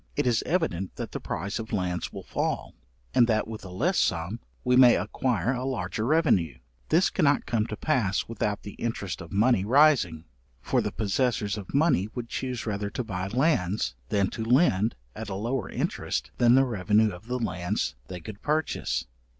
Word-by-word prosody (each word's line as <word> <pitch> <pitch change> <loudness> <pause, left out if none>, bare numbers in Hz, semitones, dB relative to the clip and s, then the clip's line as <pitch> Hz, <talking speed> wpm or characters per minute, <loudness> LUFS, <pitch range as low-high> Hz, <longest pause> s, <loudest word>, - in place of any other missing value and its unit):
It - - 0
is 120 -3 +2
evident 125 - -1
that - - -5
the - - -4
price 95 +6 -4
of 110 0 -6
lands 90 -4 -2
will - - -8
fall, - - -2 0.4
and 120 - +5
that 110 -2 +1
with 110 -1 -7
a 95 - -8
less 150 - +1
sum 85 +8 0 0.2
we 125 0 +3
may 125 -2 +8
acquire 125 -3 0
a 125 0 -3
larger 110 -4 -2
revenue; 115 - +2 0.3
this 175 +4 +3
cannot 145 -6 +2
come 110 -2 0
to 105 - -4
pass 115 -11 0
without 105 -2 -2
the 100 - -8
interest 100 -6 -3
of 85 - -10
money 105 0 +3
rising, 115 - +4 0.3
for - - +1
the - - -2
possessors 110 -1 0
of 100 -4 -8
money 140 - +3
would 120 -2 -5
chuse 125 -3 -3
rather 100 -2 -2
to 125 - -3
buy 95 -4 -4
lands, 110 - +1 0.2
than 100 -2 +1
to 110 - -4
lend 115 - +3 0.2
at - - -6
a 95 - -3
lower 115 +1 -2
interest - - -2
than 120 0 +6
the 135 0 +5
revenue 105 -1 +2
of 90 +5 -11
the 125 +1 -1
lands 90 - -2
they 90 -1 -6
could 105 +5 -9
purchase. 155 +1 -1
110 Hz, 185 wpm, -27 LUFS, 95-125 Hz, 0.4 s, may